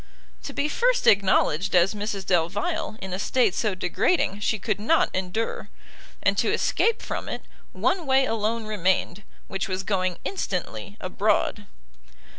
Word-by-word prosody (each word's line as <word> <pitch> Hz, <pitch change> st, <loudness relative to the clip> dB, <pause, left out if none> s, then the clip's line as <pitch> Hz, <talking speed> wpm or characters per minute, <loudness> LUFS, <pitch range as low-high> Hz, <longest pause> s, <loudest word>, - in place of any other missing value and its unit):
To -, -, -4 dB
be 285 Hz, -, 0 dB
first -, -, +1 dB
acknowledged 195 Hz, -3 st, +3 dB
as 180 Hz, +3 st, +4 dB
Mrs 205 Hz, -2 st, -4 dB
Delvile 215 Hz, -, 0 dB
in 190 Hz, -1 st, -5 dB
a 185 Hz, -, -3 dB
state 230 Hz, -2 st, +2 dB
so 210 Hz, -2 st, 0 dB
degrading, 190 Hz, -, +1 dB
she 215 Hz, +1 st, 0 dB
could 210 Hz, +1 st, -2 dB
not 315 Hz, +10 st, +2 dB
endure; 190 Hz, +5 st, -3 dB, 0.5 s
and -, -, +3 dB
to -, -, +2 dB
escape 460 Hz, 0 st, +1 dB
from -, -, -4 dB
it, -, -, -5 dB, 0.3 s
one 360 Hz, -5 st, 0 dB
way 265 Hz, 0 st, +4 dB
alone 225 Hz, 0 st, -1 dB
remained, 190 Hz, -2 st, 0 dB, 0.3 s
which 195 Hz, -, -3 dB
was 185 Hz, 0 st, -2 dB
going 185 Hz, -3 st, 0 dB
instantly 180 Hz, -, -4 dB
abroad. -, -, 0 dB
205 Hz, 145 wpm, -25 LUFS, 185-250 Hz, 0.5 s, as